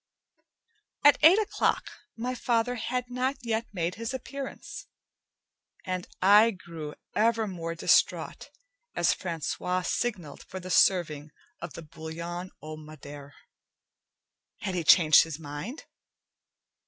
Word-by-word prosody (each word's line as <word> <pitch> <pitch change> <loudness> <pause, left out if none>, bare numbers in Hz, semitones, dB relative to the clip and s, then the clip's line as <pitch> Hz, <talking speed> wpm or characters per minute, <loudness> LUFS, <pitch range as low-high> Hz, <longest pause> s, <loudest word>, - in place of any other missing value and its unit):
At 290 - +7
eight 325 +6 +8
o'clock, 430 -2 0 0.3
my 245 +3 -2
father 240 -1 0
had 250 +1 -3
not 255 +2 0
yet 230 -1 -1
made 175 -3 -2
his 230 +3 -3
appearance, 275 - -7 1.0
and 185 -1 -3 0.2
I 210 +4 +7
grew 165 -7 -8 0.2
ever 225 +1 +2
more 165 -3 -5
distraught 165 - +1 0.5
as - - +3
Francois 180 +1 -3
signalled 180 -10 -3
for 190 - -8
the 185 0 -7
serving 155 -5 +3 0.3
of - - -6
the 170 - -8
bouillon 170 +3 -7
au 155 0 -7
madere. 145 -2 -11 1.3
Had 200 -4 -3
he 175 -2 -1
changed 155 -1 +7
his 160 -3 -4
mind? 160 - -7
185 Hz, 115 wpm, -28 LUFS, 160-230 Hz, 1.3 s, eight